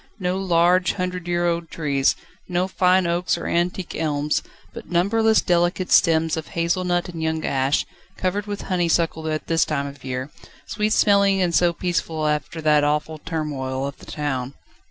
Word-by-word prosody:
No 180 0 -1
large, 180 0 +3
hundred 180 -2 -4
year 175 0 +1
old 170 -1 -1
trees, 140 -4 +1 0.3
no 180 +1 0
fine 185 -1 +3
oaks 170 +1 0
or - - -6
antique 175 +1 -1
elms, 150 -2 0 0.3
but - - -10
numberless 220 +5 +3
delicate 175 +1 +1
stems 160 -2 +4
of 160 -1 -5
hazel 170 +2 -1
nut 175 0 0
and 165 -2 -6
young 160 0 -1
ash, 135 +1 +1 0.3
covered 195 +3 -1
with 205 0 -4
honeysuckle 170 -3 0
at 155 -1 -2
this 165 0 +2
time 140 -2 -2
of 140 0 -9
year, 130 +2 -4 0.3
sweet 215 0 -1
smelling 200 -2 +4
and 180 -2 +1
so 175 +1 +4
peaceful 165 -3 -2
after 150 +2 -2
that 150 -1 +4
awful 150 +1 -1
turmoil 135 -5 -3
of 140 - -6
the - - -14
town. 135 -3 -3
170 Hz, 170 wpm, -22 LUFS, 150-180 Hz, 0.3 s, stems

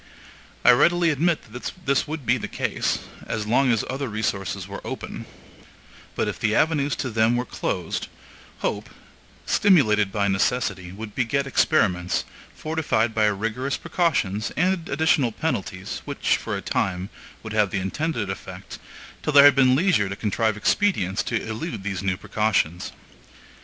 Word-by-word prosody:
I - - +9
readily 170 +6 +4
admit 155 -6 0
that 125 - -5
this 140 +1 +2
would 155 -3 -5
be 120 +3 +2
the - - -4
case, - - -1 0.3
as 110 -2 -2
long 125 +4 +3
as 115 - +1
other 135 0 -3
resources 105 -3 -2
were - - -7
open; - - -6 0.9
but - - 0
if - - -4
the 110 0 +1
avenues 145 -3 +2
to 130 - -3
them 110 +2 +3
were 125 +1 -1
closed, 90 -7 -3 0.5
HOPE, - - -2 0.6
stimulated 110 - +4
by 100 -1 0
necessity, 95 -2 0
would 105 +2 -8
beget 130 +3 0
experiments, 95 - +1 0.3
fortified 150 -8 0
by 110 -1 +3
rigorous 115 +7 -1
precautions 140 - 0
and 180 0 +1
additional 140 -4 +2
penalties, 95 -9 -3
which, - - +1
for - - -3
a - - -7
time, 95 0 -1 0.3
would 110 -1 -6
have 105 -2 +3
the 100 - -2
intended 110 - -2
effect, 95 - -8 0.4
till 150 - -2
there 140 0 +9
had 145 - +9
been 130 -1 +4
leisure 150 - +2
to 100 - -4
contrive 110 +1 0
expedients 105 - +1
to 120 - -1
elude 110 - -5
these 95 -2 -3
new 95 -1 -1
precautions. 95 -6 0
115 Hz, 150 wpm, -24 LUFS, 100-145 Hz, 0.9 s, I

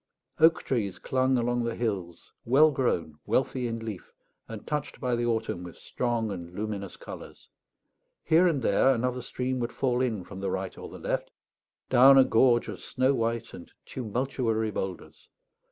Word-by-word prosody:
Oak 160 0 +5
trees 105 -8 -1
clung 130 0 +1
along 120 0 0
the 115 0 -2
hills, 95 -8 -4
well 145 +6 +5
grown, 85 - -1
wealthy 130 -1 0
in 115 0 -3
leaf, 105 -5 -7 0.4
and 110 -2 -8
touched 150 -1 -3
by 125 -3 0
the 120 0 -1
autumn 110 -6 -1
with 90 -2 -9
strong 120 -3 -2
and 85 -2 -7
luminous 100 -2 -4
colours. - - -10 0.8
Here 170 +3 +4
and 145 -7 0
there 115 +6 +4
another 125 +1 -1
stream 130 +1 -3
would 120 0 -2
fall 125 -2 0
in 110 -7 -1
from 95 +2 -10
the 100 - -2
right - - -3
or - - -9
the - - -10
left, - - -2 0.6
down 130 +2 +7
a 135 - +9
gorge 120 0 +3
of - - -6
snow 130 +2 +1
white 115 -2 -2
and 85 - -11
tumultuary 115 -2 -2
boulders. 95 -2 -6
120 Hz, 170 wpm, -28 LUFS, 105-130 Hz, 0.8 s, a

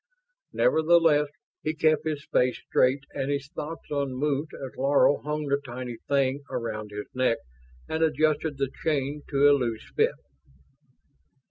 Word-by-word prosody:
Nevertheless, 160 -2 +4 0.3
he 155 +1 -2
kept 155 0 +2
his 150 -2 -3
face 125 -1 +2
straight 130 +2 +1
and 135 -1 -2
his 140 0 -2
thoughts 155 +2 -6
unmoved 140 +1 -1
as 135 -2 -8
Laro 140 +2 +3
hung 150 0 -3
the 140 0 0
tiny 125 -2 -6
thing 140 0 +2
around 110 -2 -4
his 105 0 -6
neck 130 -2 +2 0.5
and 160 - -2
adjusted 155 -1 +1
the 135 -1 -1
chain 145 -2 0
to 140 0 +4
a 145 - +7
loose 120 -5 -2
fit. - - +3
140 Hz, 140 wpm, -27 LUFS, 130-150 Hz, 0.5 s, a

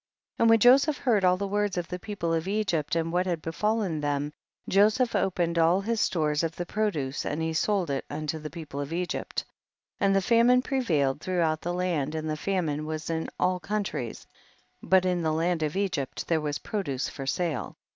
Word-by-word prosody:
27. - - +2
And 230 - +6
when 225 0 +6
Joseph 270 +6 +5
heard 220 -7 +2
all 180 0 +4
the 200 +1 -2
words 205 -1 0
of 175 -1 -2
the 180 - -5
people 180 -5 -3
of 165 +2 -1
Egypt 190 -8 0
and 165 0 -1
what 180 +1 +1
had 175 -2 -1
befallen 185 0 -1
them, 145 0 -1 0.3
Joseph 215 +5 +3
opened 175 -4 +1
all 165 +3 +4
his 225 +2 -1
stores 150 -3 +1
of 165 -1 -2
the 175 - -4
produce 165 -10 -1
and 150 - -2
he 160 0 -1
sold 180 -1 +1
it 135 - -1
unto 155 +1 -3
the 155 0 -6
people 155 -4 -7
of 145 +2 -5
Egypt. 175 +1 -3 0.5
28. - - +2
And 195 - +3
the 195 - +4
famine 240 +3 +5
prevailed 155 - 0
throughout 165 -4 0
the 175 +1 -2
land, 160 -5 -1
and 155 0 -3
the 155 - -1
famine 155 -4 -1
was 155 +1 -4
in 160 0 -2
all 180 0 +2
countries, 195 - -3 0.6
but 185 -1 +3
in 180 -1 +1
the 160 -1 0
land 165 +1 0
of 155 +1 -1
Egypt 185 -9 -2
there 165 -2 +1
was 145 -1 -2
produce 145 - -3
for 135 -2 -7
sale. 155 -2 -2
175 Hz, 205 wpm, -27 LUFS, 155-200 Hz, 0.6 s, And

